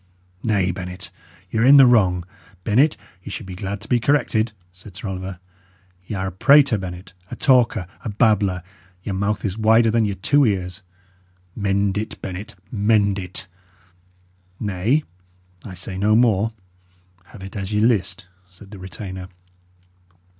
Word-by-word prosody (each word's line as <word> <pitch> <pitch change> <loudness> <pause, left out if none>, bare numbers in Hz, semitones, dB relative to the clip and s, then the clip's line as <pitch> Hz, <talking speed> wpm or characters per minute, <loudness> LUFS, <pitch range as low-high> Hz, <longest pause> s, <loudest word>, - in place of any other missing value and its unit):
"Nay, 100 -5 +1
Bennet, 90 0 -7 0.4
y' 110 - +1
are - - +3
in 140 +3 +8
the 135 - +9
wrong. 95 -8 +3 0.4
Bennet, 120 +4 +3 0.2
ye - - -9
should - - -6
be 95 - -8
glad 95 +2 -5
to 105 - -10
be 125 - +2
corrected," 120 -4 +1 0.2
said 95 +1 -14
Sir 100 - -5
Oliver. 95 0 -5 0.7
"Y' 110 - -4
are 95 -1 -2
a 95 - -3
prater, 135 +4 +5
Bennet, 90 0 -8 0.2
a - - -6
talker, 120 -7 +3 0.2
a - - -3
babbler; 100 -4 +2 0.4
your 100 - -3
mouth 100 +3 -1
is 100 +2 -3
wider 110 +1 +4
than 115 -1 +2
your 100 -2 -2
two 145 +10 +3
ears. 95 -4 -1 0.7
Mend 100 0 0
it, 110 - -6
Bennet, 95 +2 -7 0.2
mend 100 -2 +2
it." 90 +1 -7 1.1
"Nay, 105 +8 0 0.6
I 95 -4 -8
say 95 +2 -5
no 105 +2 +3
more. 115 -2 +3 0.7
Have 100 0 -13
it 95 - -9
as 100 -1 -4
ye 105 - +1
list," 105 -5 +1 0.2
said 95 +2 -16
the 100 - -10
retainer. 95 0 -7
100 Hz, 155 wpm, -21 LUFS, 95-110 Hz, 1.1 s, the